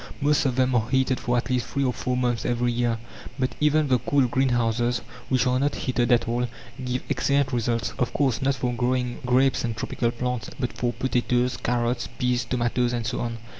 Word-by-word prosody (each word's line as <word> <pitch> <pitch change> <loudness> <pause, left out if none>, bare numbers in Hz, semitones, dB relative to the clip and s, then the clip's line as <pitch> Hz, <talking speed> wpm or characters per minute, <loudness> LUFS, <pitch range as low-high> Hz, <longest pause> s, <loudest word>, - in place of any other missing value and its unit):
Most 145 -1 +3
of 130 - -1
them 130 0 +2
are 115 -1 +1
heated 130 -1 +2
for 120 0 0
at 120 - -1
least 125 -2 0
three 140 - -1
of 125 -2 0
four 125 0 -1
months 120 -2 0
every 120 0 +1
year; 120 -1 0 0.4
but 130 -2 0
even 150 0 +3
the 130 -2 +3
cool 130 +2 +2
greenhouses, 120 -2 +1 0.3
which 130 -1 +2
are 125 0 +2
not 145 +1 +1
heated 125 -1 0
at 120 -1 +3
all, 120 +1 0 0.4
give 125 0 -2
excellent 140 -1 +1
results 115 -1 0
of 125 - +1
course, 130 -7 +1
not 135 0 +2
for 125 -1 -1
growing 125 0 -1
grapes 130 +2 +3
and 115 -2 -2
tropical 115 +2 -1
plants, 125 -1 -3
but 125 -2 -2
for 120 -1 -1
potatoes, 125 0 0
carrots, 120 0 -1
peas, 125 0 +1
tomatoes, 120 0 0
and 120 -2 -2
so 115 - -2
on. 115 -1 -3
125 Hz, 205 wpm, -25 LUFS, 120-130 Hz, 0.4 s, Most